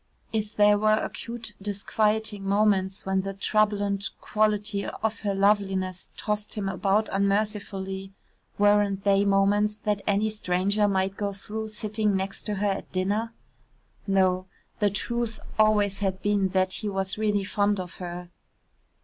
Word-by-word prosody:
If 215 Hz, -1 st, -2 dB
there 205 Hz, 0 st, +5 dB
were 215 Hz, 0 st, +4 dB
acute 230 Hz, -2 st, -5 dB
disquieting 210 Hz, +1 st, 0 dB
moments 195 Hz, -1 st, +1 dB
when 190 Hz, 0 st, +1 dB
the 195 Hz, 0 st, -5 dB
troublante 205 Hz, -1 st, +1 dB
quality 210 Hz, -1 st, 0 dB
of 220 Hz, +2 st, -3 dB
her 200 Hz, -2 st, -1 dB
loveliness 195 Hz, -2 st, +1 dB
tossed 210 Hz, 0 st, -2 dB
him 205 Hz, -2 st, -2 dB
about 195 Hz, +2 st, +1 dB
unmercifully 195 Hz, -1 st, -1 dB, 0.5 s
weren't 205 Hz, -1 st, +3 dB
they 200 Hz, 0 st, +3 dB
moments 205 Hz, +1 st, +3 dB
that 210 Hz, -1 st, -1 dB
any 210 Hz, +1 st, +2 dB
stranger 200 Hz, +1 st, +1 dB
might 195 Hz, 0 st, 0 dB
go 200 Hz, -1 st, -2 dB
through 220 Hz, +3 st, -5 dB
sitting 215 Hz, -1 st, -1 dB
next 190 Hz, +3 st, -3 dB
to 210 Hz, -, -1 dB
her 205 Hz, +1 st, 0 dB
at 195 Hz, -, -5 dB
dinner? 205 Hz, +5 st, 0 dB, 0.8 s
No 185 Hz, -1 st, +2 dB, 0.3 s
the 205 Hz, -, +3 dB
truth 230 Hz, +2 st, -2 dB, 0.2 s
always 210 Hz, -2 st, +3 dB
had 190 Hz, -2 st, -2 dB
been 205 Hz, -2 st, +2 dB
that 185 Hz, 0 st, +1 dB
he 210 Hz, -, -3 dB
was 195 Hz, +1 st, -2 dB
really 210 Hz, -2 st, +1 dB
fond 205 Hz, +1 st, +1 dB
of 180 Hz, -1 st, -6 dB
her. 175 Hz, 0 st, -7 dB
205 Hz, 140 wpm, -26 LUFS, 195-210 Hz, 0.8 s, there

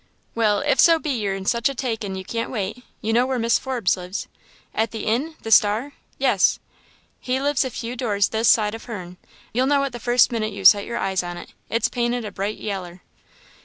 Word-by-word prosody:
"Well 215 Hz, -3 st, +2 dB
if 290 Hz, 0 st, +1 dB
so 330 Hz, -1 st, +7 dB
be 310 Hz, -2 st, -3 dB
you're 210 Hz, -6 st, -1 dB
in 195 Hz, 0 st, -6 dB
such 235 Hz, +3 st, +2 dB
a 275 Hz, -, -5 dB
takin' 225 Hz, -6 st, -3 dB
you 190 Hz, 0 st, -6 dB
can't 230 Hz, +3 st, -3 dB
wait 220 Hz, +1 st, -4 dB, 0.2 s
you 220 Hz, +1 st, -1 dB
know 245 Hz, +2 st, +3 dB
where 260 Hz, -1 st, -1 dB
Mis' 230 Hz, -1 st, +2 dB
Forbes 245 Hz, -8 st, 0 dB
lives?" 180 Hz, +2 st, -6 dB, 0.5 s
"At 220 Hz, +1 st, 0 dB
the 220 Hz, -1 st, -6 dB
inn? 275 Hz, +9 st, -1 dB
the 225 Hz, -, -5 dB
Star! 220 Hz, +7 st, +4 dB, 0.2 s
yes." -, -, +3 dB, 0.6 s
"He 255 Hz, +1 st, -1 dB
lives 285 Hz, 0 st, +1 dB
a 260 Hz, -, -3 dB
few 235 Hz, 0 st, -5 dB
doors 210 Hz, -5 st, +1 dB
this 220 Hz, +1 st, 0 dB
side 210 Hz, -2 st, +4 dB
o' 225 Hz, -, -6 dB
her'n; 185 Hz, -7 st, -8 dB, 0.4 s
you'll 255 Hz, +3 st, +2 dB
know 280 Hz, 0 st, +3 dB
it 275 Hz, -, -2 dB
the 240 Hz, -, -7 dB
first 240 Hz, +2 st, +3 dB
minute 220 Hz, -2 st, -2 dB
you 195 Hz, -1 st, -7 dB
set 200 Hz, +1 st, +7 dB
your 235 Hz, -, -3 dB
eyes 190 Hz, -3 st, 0 dB
on 175 Hz, -1 st, -6 dB
it -, -, -11 dB, 0.2 s
it's 230 Hz, 0 st, +1 dB
painted 240 Hz, -1 st, -1 dB
a 210 Hz, -, -5 dB
bright 200 Hz, +2 st, -3 dB
yaller." 185 Hz, -4 st, -6 dB
225 Hz, 220 wpm, -22 LUFS, 200-250 Hz, 0.6 s, so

